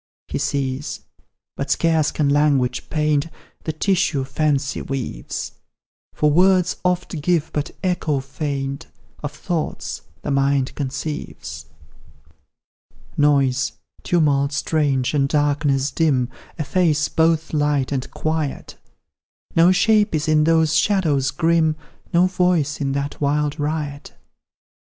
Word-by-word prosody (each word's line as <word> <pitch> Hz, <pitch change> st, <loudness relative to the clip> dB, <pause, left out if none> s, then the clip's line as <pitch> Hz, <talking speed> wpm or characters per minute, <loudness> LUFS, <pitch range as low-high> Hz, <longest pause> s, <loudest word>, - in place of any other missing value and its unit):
He -, -, -3 dB
sees 135 Hz, 0 st, -2 dB, 0.5 s
but 140 Hz, -, -4 dB
scarce 160 Hz, 0 st, +2 dB
can 150 Hz, -, 0 dB
language 140 Hz, -4 st, +2 dB
paint 150 Hz, -1 st, +1 dB, 0.4 s
The 160 Hz, -, 0 dB
tissue 170 Hz, -3 st, +1 dB
fancy 145 Hz, 0 st, 0 dB
weaves; 135 Hz, -, -4 dB, 0.6 s
For 150 Hz, 0 st, +2 dB
words 185 Hz, +2 st, +4 dB
oft 180 Hz, -3 st, -1 dB
give 170 Hz, -1 st, +1 dB
but 150 Hz, -1 st, -2 dB
echo 165 Hz, -6 st, 0 dB
faint 140 Hz, +1 st, -4 dB, 0.3 s
Of 145 Hz, -, -4 dB
thoughts 160 Hz, +1 st, -4 dB, 0.2 s
the 145 Hz, -, -2 dB
mind 140 Hz, -1 st, +1 dB
conceives. 145 Hz, -, -5 dB, 1.5 s
Noise, 135 Hz, -3 st, +2 dB, 0.3 s
tumult 145 Hz, -4 st, +2 dB
strange, 140 Hz, -3 st, 0 dB
and 140 Hz, -2 st, +2 dB
darkness 145 Hz, -2 st, +1 dB
dim, 135 Hz, -7 st, +1 dB, 0.3 s
Efface 155 Hz, -1 st, +1 dB
both 160 Hz, 0 st, +1 dB
light 145 Hz, -3 st, +1 dB
and 130 Hz, -2 st, -2 dB
quiet; 155 Hz, -3 st, -3 dB, 0.8 s
No 170 Hz, +2 st, +6 dB
shape 210 Hz, -1 st, +3 dB
is 155 Hz, +1 st, -1 dB
in 155 Hz, -1 st, +4 dB
those 160 Hz, -1 st, +3 dB
shadows 155 Hz, -10 st, +2 dB
grim, 160 Hz, +1 st, +2 dB, 0.4 s
No 175 Hz, 0 st, +4 dB
voice 180 Hz, -5 st, +1 dB
in 135 Hz, -1 st, 0 dB
that 140 Hz, +1 st, -3 dB
wild 150 Hz, +1 st, 0 dB
riot. 145 Hz, -1 st, -3 dB
150 Hz, 115 wpm, -21 LUFS, 140-160 Hz, 1.5 s, No